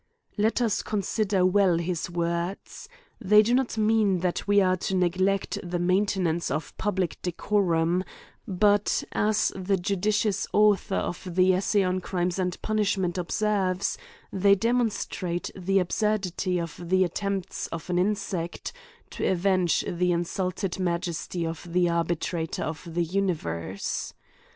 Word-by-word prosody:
Let 220 Hz, +4 st, +1 dB
us 225 Hz, -4 st, +1 dB
consider 200 Hz, -2 st, 0 dB
well 185 Hz, -2 st, +4 dB
his 170 Hz, 0 st, -2 dB
words: 170 Hz, -, -3 dB, 0.3 s
They 210 Hz, +2 st, +6 dB
do 235 Hz, +3 st, +1 dB
not 255 Hz, -3 st, +1 dB
mean 215 Hz, -4 st, +2 dB
that 180 Hz, +1 st, -1 dB
we 205 Hz, 0 st, +5 dB
are 185 Hz, -1 st, +3 dB
to 190 Hz, +1 st, -2 dB
neglect 185 Hz, +2 st, +1 dB
the 175 Hz, 0 st, -3 dB
mainte 185 Hz, +3 st, +1 dB
nance 170 Hz, -1 st, 0 dB
of 155 Hz, +1 st, -4 dB
public 190 Hz, -4 st, -1 dB
decorum; 180 Hz, -2 st, +1 dB, 0.4 s
but, 205 Hz, +1 st, +2 dB
as 210 Hz, +1 st, +1 dB
the 195 Hz, +1 st, 0 dB
judicious 200 Hz, +3 st, 0 dB
author 205 Hz, -2 st, +3 dB
of 175 Hz, -, -2 dB
the 185 Hz, 0 st, +5 dB
"Essay 195 Hz, +2 st, +2 dB
on 185 Hz, 0 st, 0 dB
Crimes 180 Hz, 0 st, -2 dB
and 180 Hz, -1 st, -1 dB
Punish 215 Hz, -2 st, +1 dB
ments" 180 Hz, -1 st, -1 dB
observes, 195 Hz, 0 st, 0 dB, 0.4 s
they 200 Hz, +1 st, +5 dB
demonstrate 205 Hz, -6 st, -1 dB
the 195 Hz, +1 st, 0 dB
absurdity 185 Hz, -1 st, 0 dB
of 170 Hz, 0 st, -6 dB
the 185 Hz, 0 st, +4 dB
attempts 195 Hz, +1 st, -3 dB
of 165 Hz, -, -7 dB
an 175 Hz, -, +2 dB
insect, 190 Hz, -3 st, -2 dB, 0.4 s
to -, -, -2 dB
avenge 185 Hz, -1 st, +2 dB
the 180 Hz, +1 st, 0 dB
insult 175 Hz, +2 st, -2 dB
ed 190 Hz, -1 st, -2 dB
majesty 170 Hz, -1 st, -2 dB
of 165 Hz, +1 st, -6 dB
the 180 Hz, 0 st, +3 dB
arbitrator 170 Hz, 0 st, -1 dB
of 160 Hz, 0 st, -5 dB
the 170 Hz, +1 st, 0 dB
universe. 150 Hz, -, -2 dB
185 Hz, 140 wpm, -26 LUFS, 175-200 Hz, 0.4 s, They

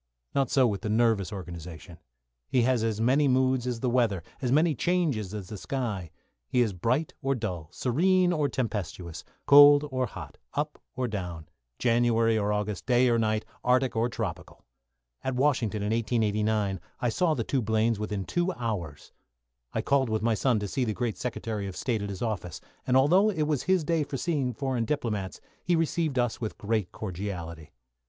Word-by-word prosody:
Not 135 Hz, -3 st, +1 dB
so 135 Hz, -2 st, +4 dB
with 105 Hz, -5 st, -1 dB
the 110 Hz, -, -3 dB
nervous 110 Hz, -4 st, +2 dB
organisation. 85 Hz, -3 st, -8 dB, 0.5 s
He 125 Hz, -, +3 dB
has 125 Hz, -2 st, +2 dB
as 110 Hz, -2 st, -1 dB
many 135 Hz, +6 st, +3 dB
moods 130 Hz, -1 st, +2 dB
as 120 Hz, -2 st, -3 dB
the 130 Hz, -, 0 dB
weather, 115 Hz, -8 st, +1 dB, 0.2 s
as 125 Hz, -2 st, 0 dB
many 155 Hz, +3 st, +4 dB
changes 145 Hz, -, 0 dB
as 105 Hz, -4 st, -6 dB
the 105 Hz, -, -7 dB
sky. 110 Hz, -11 st, -3 dB, 0.4 s
He 125 Hz, -, 0 dB
is 110 Hz, -5 st, +1 dB
bright 125 Hz, -, 0 dB
or 135 Hz, 0 st, +1 dB
dull, 90 Hz, -9 st, -4 dB
serene 180 Hz, +8 st, +2 dB
or 150 Hz, -4 st, +1 dB
tempestuous, 90 Hz, -9 st, -4 dB, 0.2 s
cold 145 Hz, +1 st, +8 dB
or 130 Hz, -1 st, 0 dB
hot, -, -, -10 dB, 0.2 s
up -, -, -2 dB
or 125 Hz, 0 st, -1 dB
down, 90 Hz, -7 st, -5 dB, 0.3 s
January 115 Hz, -1 st, +3 dB
or 105 Hz, -1 st, +1 dB
August, 105 Hz, -1 st, -2 dB
day 125 Hz, 0 st, +4 dB
or 115 Hz, -1 st, +3 dB
night, 110 Hz, -1 st, 0 dB, 0.2 s
Arctic 125 Hz, 0 st, +2 dB
or 115 Hz, +2 st, +1 dB
tropical. 110 Hz, -7 st, -6 dB, 0.6 s
At 130 Hz, -1 st, -2 dB
Washington, 125 Hz, -6 st, +1 dB
in 105 Hz, -, -1 dB
1889, 105 Hz, -3 st, 0 dB, 0.2 s
I 120 Hz, -, +1 dB
saw 160 Hz, +6 st, +1 dB
the 120 Hz, -, -1 dB
two 130 Hz, +3 st, 0 dB
Blaines 110 Hz, 0 st, +1 dB
within 105 Hz, -2 st, -3 dB
two 175 Hz, +1 st, 0 dB
hours. 90 Hz, -, -5 dB, 0.6 s
I -, -, -2 dB
called 135 Hz, -3 st, +2 dB
with 110 Hz, 0 st, -1 dB
my 115 Hz, 0 st, +3 dB
son 120 Hz, +2 st, +2 dB
to 105 Hz, -, -2 dB
see 130 Hz, +5 st, -1 dB
the 110 Hz, -3 st, -1 dB
great 120 Hz, -4 st, -2 dB
Secretary 110 Hz, -4 st, -3 dB
of 95 Hz, -2 st, -7 dB
State 115 Hz, +1 st, -1 dB
at 100 Hz, -, -4 dB
his 100 Hz, +1 st, -5 dB
office, 100 Hz, -7 st, -3 dB, 0.3 s
and 130 Hz, 0 st, +4 dB
although 180 Hz, +10 st, +5 dB
it 165 Hz, -7 st, 0 dB
was 150 Hz, -3 st, 0 dB
his 185 Hz, -2 st, +2 dB
day 165 Hz, +1 st, +1 dB
for 140 Hz, -1 st, -5 dB
seeing 140 Hz, -5 st, 0 dB
foreign 130 Hz, -3 st, -1 dB
diplomats, 110 Hz, -8 st, -2 dB, 0.2 s
he 175 Hz, -, +2 dB
received 160 Hz, -3 st, 0 dB
us 120 Hz, -1 st, 0 dB
with 110 Hz, -, -4 dB
great 105 Hz, -3 st, -1 dB
cordiality. 85 Hz, -5 st, -6 dB
115 Hz, 185 wpm, -28 LUFS, 105-130 Hz, 0.6 s, cold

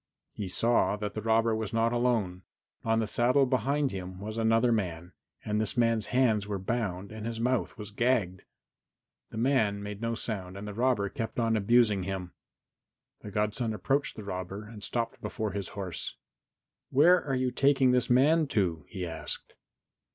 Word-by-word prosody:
He 100 Hz, -, -4 dB
saw 115 Hz, +3 st, +2 dB
that 105 Hz, 0 st, -4 dB
the 110 Hz, -, -4 dB
robber 115 Hz, +1 st, +2 dB
was 110 Hz, -1 st, -4 dB
not 115 Hz, +1 st, +2 dB
alone. 115 Hz, -7 st, 0 dB, 0.4 s
On 115 Hz, 0 st, +2 dB
the 110 Hz, -, +1 dB
saddle, 125 Hz, +5 st, +3 dB
behind 135 Hz, +2 st, +1 dB
him, 95 Hz, -1 st, -6 dB
was 110 Hz, +2 st, -6 dB
another 115 Hz, +1 st, +3 dB
man, 90 Hz, -5 st, -2 dB, 0.3 s
and 105 Hz, 0 st, 0 dB
this 110 Hz, +2 st, -1 dB
man's 115 Hz, -3 st, +2 dB
hands 115 Hz, -5 st, +2 dB
were 105 Hz, -1 st, -2 dB
bound 95 Hz, -2 st, -3 dB
and 110 Hz, 0 st, -6 dB
his 115 Hz, -1 st, -4 dB
mouth 125 Hz, +1 st, 0 dB
was 105 Hz, -1 st, -7 dB
gagged. 105 Hz, -5 st, +1 dB, 0.9 s
The -, -, -8 dB
man 110 Hz, -5 st, +1 dB
made 105 Hz, 0 st, -6 dB
no 115 Hz, 0 st, -1 dB
sound 95 Hz, -5 st, -4 dB
and 105 Hz, +1 st, -7 dB
the 105 Hz, -, -5 dB
robber 120 Hz, -2 st, +1 dB
kept 110 Hz, +1 st, -4 dB
on 115 Hz, -1 st, +2 dB
abusing 110 Hz, -1 st, +3 dB
him. 90 Hz, -1 st, -4 dB, 0.9 s
The 105 Hz, -, -8 dB
godson 105 Hz, +2 st, -1 dB
approached 135 Hz, +8 st, 0 dB
the 110 Hz, -, -8 dB
robber 95 Hz, +1 st, -5 dB
and 105 Hz, -1 st, -11 dB
stopped 115 Hz, -1 st, -3 dB
before 110 Hz, -2 st, -3 dB
his 100 Hz, -3 st, -3 dB
horse. 95 Hz, -4 st, -4 dB, 0.7 s
"Where 175 Hz, +7 st, +5 dB
are 135 Hz, -2 st, -1 dB
you 130 Hz, 0 st, 0 dB
taking 135 Hz, 0 st, +4 dB
this 125 Hz, -1 st, +2 dB
man 150 Hz, +6 st, +4 dB
to?" 90 Hz, -, 0 dB
he 95 Hz, -4 st, -4 dB
asked. 80 Hz, -2 st, -4 dB
110 Hz, 175 wpm, -29 LUFS, 100-120 Hz, 0.9 s, Where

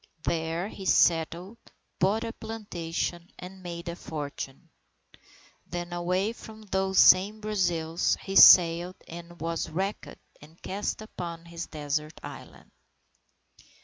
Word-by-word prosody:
There 165 Hz, +2 st, -1 dB
he 195 Hz, -3 st, -8 dB
settled, 170 Hz, +7 st, +2 dB, 0.4 s
bought 205 Hz, +4 st, +2 dB
a 230 Hz, 0 st, -4 dB
plantation 175 Hz, -5 st, -5 dB
and 185 Hz, +1 st, -10 dB
made 170 Hz, -1 st, -7 dB
a 170 Hz, -, -4 dB
fortune. 145 Hz, -5 st, -7 dB, 1.0 s
Then, 175 Hz, 0 st, -5 dB
away 180 Hz, +5 st, 0 dB
from 220 Hz, -2 st, -12 dB
those 190 Hz, -1 st, -1 dB
same 200 Hz, +4 st, +6 dB
Brazils, 175 Hz, -6 st, 0 dB
he 195 Hz, -, -5 dB
sailed 175 Hz, 0 st, +8 dB
and 170 Hz, +1 st, -10 dB
was 165 Hz, +1 st, -3 dB
wrecked 190 Hz, +6 st, -4 dB, 0.2 s
and 155 Hz, +3 st, -17 dB
cast 205 Hz, +2 st, -3 dB
upon 170 Hz, -5 st, -7 dB
his 170 Hz, 0 st, -7 dB
Desert 150 Hz, 0 st, -4 dB
Island. -, -, -11 dB
175 Hz, 115 wpm, -27 LUFS, 165-195 Hz, 1.0 s, sailed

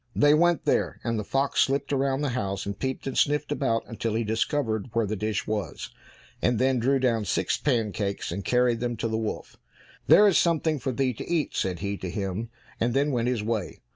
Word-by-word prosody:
They 145 Hz, 0 st, +5 dB
went 170 Hz, +2 st, +3 dB
there, -, -, +1 dB
and 115 Hz, -2 st, -1 dB
the -, -, -3 dB
fox 135 Hz, +6 st, +1 dB
slipped 140 Hz, +2 st, +1 dB
round 135 Hz, 0 st, 0 dB
the 145 Hz, -, 0 dB
house, 100 Hz, -6 st, -2 dB
and 100 Hz, 0 st, -5 dB
peeped 130 Hz, -1 st, -3 dB
and 135 Hz, -, -3 dB
sniffed 150 Hz, 0 st, +1 dB
about 115 Hz, -6 st, 0 dB
until 115 Hz, -1 st, -3 dB
he 115 Hz, -, +1 dB
discovered 110 Hz, +1 st, -1 dB
where 115 Hz, -1 st, +2 dB
the 105 Hz, +2 st, -2 dB
dish 105 Hz, 0 st, -2 dB
was, 105 Hz, -2 st, -4 dB, 0.5 s
and 120 Hz, -1 st, +2 dB
then 130 Hz, +1 st, +2 dB
drew 135 Hz, +4 st, +2 dB
down 120 Hz, -5 st, +1 dB
six -, -, 0 dB
pancakes 105 Hz, -, -1 dB
and 100 Hz, +3 st, -4 dB
carried 125 Hz, +2 st, +2 dB
them 120 Hz, -1 st, -2 dB
to 115 Hz, -, -1 dB
the 110 Hz, -, -2 dB
wolf. 110 Hz, -1 st, -5 dB, 0.5 s
"There 210 Hz, -, +8 dB
is 195 Hz, -, +4 dB
something 160 Hz, -3 st, +1 dB
for 130 Hz, -, -2 dB
thee 130 Hz, +1 st, 0 dB
to -, -, -8 dB
eat," 165 Hz, -4 st, 0 dB
said 90 Hz, -2 st, -1 dB
he 100 Hz, 0 st, -2 dB
to 95 Hz, -, -5 dB
him, 100 Hz, +4 st, -3 dB, 0.3 s
and 120 Hz, +2 st, 0 dB
then 145 Hz, +2 st, +2 dB
went 120 Hz, -2 st, 0 dB
his 125 Hz, -4 st, 0 dB
way. 110 Hz, -4 st, -3 dB
120 Hz, 215 wpm, -26 LUFS, 110-135 Hz, 0.5 s, There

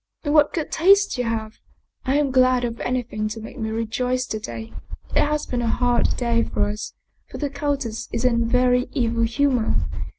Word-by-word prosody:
" -, -, -50 dB
And 290 Hz, -2 st, 0 dB
what 300 Hz, -1 st, +5 dB
good 320 Hz, -3 st, -3 dB
taste 395 Hz, +4 st, +4 dB
you 245 Hz, -, 0 dB
have! 220 Hz, -1 st, -3 dB, 0.5 s
I 265 Hz, -, +1 dB
am 290 Hz, -2 st, +1 dB
glad 255 Hz, -1 st, +4 dB
of 235 Hz, -1 st, -3 dB
anything 245 Hz, -4 st, -2 dB
to 215 Hz, +1 st, -5 dB
make 225 Hz, +4 st, -9 dB
me 220 Hz, -1 st, -2 dB
rejoice 250 Hz, +3 st, -1 dB
to 215 Hz, -, -4 dB
day. 115 Hz, -, -7 dB, 0.4 s
It -, -, +5 dB
has 300 Hz, 0 st, -1 dB
been 245 Hz, -1 st, -2 dB
a 235 Hz, -, -1 dB
hard 245 Hz, +1 st, +1 dB
day 235 Hz, -2 st, +1 dB
for 205 Hz, -, -1 dB
us, 210 Hz, +1 st, -6 dB, 0.3 s
for -, -, -7 dB
the 290 Hz, -2 st, -2 dB
countess 280 Hz, -6 st, -3 dB
is 230 Hz, -, -1 dB
in 235 Hz, -2 st, +3 dB
a -, -, +1 dB
very 250 Hz, +1 st, +3 dB
evil 235 Hz, -4 st, 0 dB
humor. 245 Hz, -1 st, +1 dB
245 Hz, 205 wpm, -23 LUFS, 225-270 Hz, 0.5 s, what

